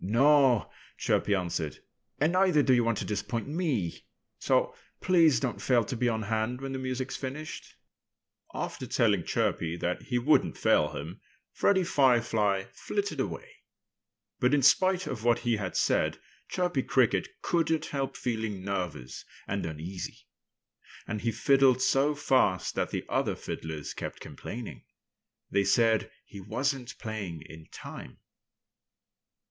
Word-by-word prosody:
"No!" 130 +3 +4 0.3
Chirpy 100 - +1
answered. 85 -4 -2 0.4
"And 155 +4 +2
neither 185 -5 +4
do 130 - +4
you 120 -1 +4
want 115 -1 +1
to - - -3
disappoint 105 +3 -3
me. 145 - -1 0.4
So - - +2 0.3
please 170 -6 +4
don't 130 -3 -3
fail 125 -3 +3
to 125 - -4
be 125 +1 +1
on 110 -1 -1
hand 110 +4 -1
when 135 0 -5
the 135 - -3
music's 130 0 -3
finished." 145 +4 -6 0.8
After - - -5
telling 105 -6 +2
Chirpy 85 +1 -1
that 90 +1 -2
he 125 - -2
wouldn't 135 +6 +3
fail - - +3
him, - - -7 0.3
Freddie 190 -2 +2
Firefly 115 - +2
flitted - - -3
away. - - -3 0.9
But 125 +4 +3
in 140 - +1
spite 185 +6 +4
of 110 -4 -5
what 120 0 +4
he 120 -2 +2
had 95 -3 -3
said - - +1 0.3
Chirpy 180 -6 0
Cricket 115 -8 +2 0.2
couldn't 165 -2 +1
help 135 -2 -3
feeling 110 -5 -3
nervous 90 -10 -4 0.2
and 100 -3 -2
uneasy. 80 +4 -7 0.8
And 105 -1 -3
he 115 +2 0
fiddled 135 +2 +4
so 135 +3 +2
fast 130 - +2
that - - -1
the - - -4
other - - 0
fiddlers 80 -2 -6
kept - - -6
complaining. 120 -1 -8 0.7
They 100 - +3
said 115 0 +3 0.2
he 100 - -11
wasn't 125 +5 -2
playing 100 -7 -5
in 80 0 -12
time. - - -9
120 Hz, 140 wpm, -29 LUFS, 100-135 Hz, 0.9 s, No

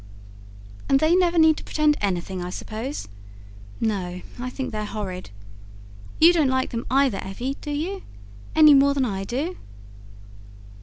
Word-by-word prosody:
"And 270 - +4
they 315 +4 +3
never 355 -2 +2
need 320 -1 +5
to - - -8
pretend 305 -1 +2
anything, 185 -1 -2
I 180 - -5
suppose? 225 - -6 0.7
No, 185 -5 -2 0.2
I 250 +1 -3
think 265 +1 -5
they're 215 -1 -3
horrid. 200 -4 -5 0.9
You 335 +2 +7
don't 315 -5 +3
like 260 0 0
them 230 -1 -4
either, 265 -5 +2
Evvy, 245 +8 -4
do - - -7
you?... 335 +7 -3 0.5
any 305 -2 +8
more 280 0 +5
than 270 -2 +1
I 195 -4 -3
do?" 290 - -3
260 Hz, 150 wpm, -24 LUFS, 205-305 Hz, 0.9 s, any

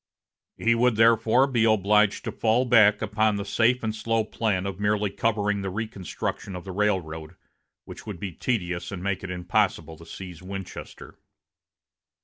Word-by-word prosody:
He 115 - +2
would 120 0 +2
therefore 115 +3 +4
be 125 -5 +1
obliged 105 -1 +3
to - - -3
fall 115 +3 +1
back 110 -4 +5
upon 110 0 +1
the 100 0 -3
safe 115 +4 +2
and 110 -1 -1
slow 115 +1 0
plan 105 -3 -1
of 100 -1 -5
merely 105 -1 +1
covering 105 -1 0
the 95 - -3
reconstruction 100 -2 -5
of 90 - -7
the 95 - -7
railroad, 90 -6 -2 0.5
which - - -11
would 100 -5 -6
be 95 0 -4
tedious 90 -3 -3
and 90 -2 -6
make 100 -1 -2
it 95 - -5
impossible 85 -3 -1
to 85 - -12
seize 90 -1 -9
Winchester. 95 0 -9
105 Hz, 160 wpm, -25 LUFS, 95-110 Hz, 0.5 s, back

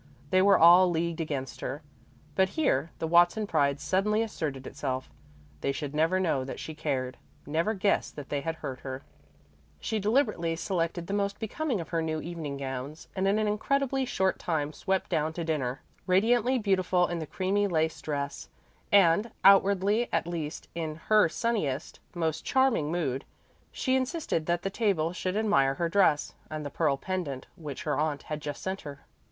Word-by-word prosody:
They 185 - +5
were 200 +1 +6
all 175 +2 +8
leagued 170 0 -1
against 140 -4 -4
her. 145 +4 -4 0.5
But 190 +2 +3
here 160 - +2
the - - -2
Watson 175 +6 +4
pride 140 -6 +1
suddenly 210 +6 +1
asserted 145 -11 -4
itself 130 -1 -4 0.5
they 140 - 0
should 140 +1 -5
never 165 +5 +2
know 160 -8 +1
that 130 - -6
she 160 - -6
cared, 135 -5 -2 0.3
never 165 +9 0
guess 200 +1 +1
that 145 -2 -9
they 145 -1 -1
had 165 +2 -3
hurt 130 -5 -6
her. 130 0 -6 0.8
She 220 - -2
deliberately 210 -7 +1
selected 170 -1 -2
the 195 - -4
most 200 0 0
becoming 240 +2 -2
of 165 - -6
her 165 -1 0
new 160 -1 -2
evening 155 -4 -5
gowns, 135 +2 -6
and 190 0 +1
in 200 +2 +3
an 215 -1 +1
incredibly 270 +5 0
short 190 -6 0
time 155 -3 -1
swept 190 +2 -1
down 155 +1 0
to 170 - -4
dinner, 135 -5 -2 0.2
radiantly 235 +7 +3
beautiful 185 -4 +2
in 175 -1 -3
the 160 - -5
creamy 195 +4 0
lace 160 -3 0
dress, 140 -2 -4 0.4
and 200 +2 +5
outwardly 200 +3 +5
at 165 - +1
least 165 -2 -5
in 160 -2 -3
her 210 +2 +3
sunniest, 160 - -2 0.2
most 160 -2 -1
charming 255 - +2
mood. 140 -6 -1 0.5
She 260 -1 0
insisted 260 - -1
that 175 0 0
the 195 - -2
table 190 -7 +1
should 185 +2 -2
admire 140 -12 +3
her 170 +3 -1
dress, 165 -6 +3 0.2
and 155 -1 -5
the 145 - -5
pearl 145 -2 +1
pendant 150 -5 -4
which 150 -5 -7
her 150 -2 -1
aunt 150 -2 -1
had 155 -1 -5
just 145 -2 -6
sent 190 +1 -3
her. 145 -1 -9
170 Hz, 175 wpm, -28 LUFS, 150-200 Hz, 0.8 s, all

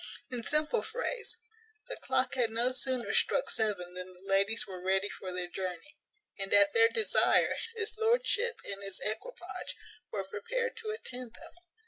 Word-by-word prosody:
In 245 -2 -3
simple 305 - +3
phrase, 475 +1 -4 0.5
the - - -4
clock - - 0
had 245 -3 +2
no 235 +3 +2
sooner 255 -1 -1
struck - - +3
seven 200 -5 +1
than 180 0 -7
the 180 - -17
ladies 195 +3 +3
were 185 -2 -8
ready 190 +2 +2
for 185 - -7
their 180 -1 -2
journey; 185 - -6 0.4
and, 195 0 -2
at 200 0 +6
their 455 0 +6
desire, 450 -2 +4 0.2
his 445 0 -2
lordship 475 +1 +2
and 200 0 -4
his 195 -1 -5
equipage 220 - -3 0.4
were 200 -2 -2
prepared 470 - -3
to 435 - -5
attend 255 - -6
them. - - -12
225 Hz, 160 wpm, -31 LUFS, -, 0.5 s, at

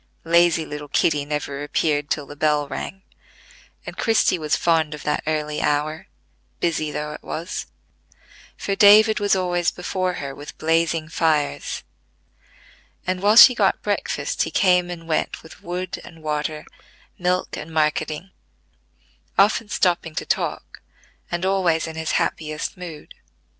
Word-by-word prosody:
Lazy 170 -1 +4
little 150 0 -7
Kitty 145 0 +1
never 145 -1 -3
appeared 145 0 0
till 145 - -1
the 145 - -10
bell 150 -1 +1
rang; 190 +7 -6 0.8
and - - -7
Christie 225 -6 +2
was 155 -1 0
fond 160 -3 +1
of 150 - -11
that 150 - 0
early 150 -1 -1
hour, 150 +2 -1 0.5
busy 165 -2 0
though 150 0 -4
it - - -9
was, 170 +5 -5 0.9
for 200 - -2
David 215 +2 +7
was 205 -1 +2
always 175 -2 +1
before 185 0 -2
her 140 -4 -5
with 145 +2 -10
blazing 165 0 +1
fires; 155 -3 0 1.2
and, 185 0 -1
while 205 +2 +4
she 250 +2 +10
got - - +1
breakfast, - - -2
he - - +1
came 180 -2 +3
and 165 -2 -8
went 155 - -1
with 160 - -14
wood 180 +1 -5
and 165 -2 -14
water, 150 0 -3 0.5
milk 180 0 0
and 165 - -8
marketing; 155 +3 -1 1.1
often 210 +2 +3
stopping 175 -5 0
to - - -3
talk, - - -3 0.5
and 175 +1 -2
always 185 -4 +2
in 160 -1 -7
his 160 0 -2
happiest 155 -1 -2
mood. 170 -5 -9
160 Hz, 140 wpm, -22 LUFS, 150-180 Hz, 1.2 s, she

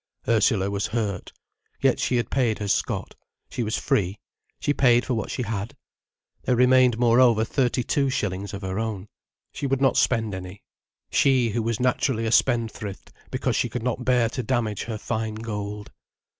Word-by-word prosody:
Ursula 110 -3 +2
was 100 0 -1
hurt. 105 -4 -3 0.5
Yet - - +2
she 125 - 0
had 120 - -1
paid 120 -5 +1
her 105 - -4
scot. 100 - -1 0.4
She - - -3
was 110 -2 -1
free. 95 0 0 0.4
She 145 - +1
paid 125 -3 +4
for 130 - -1
what 110 -3 -2
she 125 - -3
had. 110 -1 -4 0.7
There 125 - +1
remained 125 -1 +5
moreover 120 -1 +4
thirty 125 0 0
two 140 +1 +1
shillings 100 -5 -2
of 100 - -8
her 95 +2 -3
own. 105 -3 -4 0.4
She 140 - -3
would 135 0 0
not 135 -1 +3
spend 110 -4 +2
any, 95 +1 -8 0.5
she 130 -4 +3
who 115 - -1
was 115 0 -1
naturally 125 -2 +1
a 110 - 0
spendthrift, 115 -5 0 0.2
because - - -1
she - - 0
could 120 -2 -4
not 125 0 -2
bear 125 -2 +3
to 125 - -3
damage 115 -4 -1
her 115 -2 -4
fine 110 0 -3
gold. 105 -2 -5
115 Hz, 175 wpm, -24 LUFS, 105-125 Hz, 0.7 s, remained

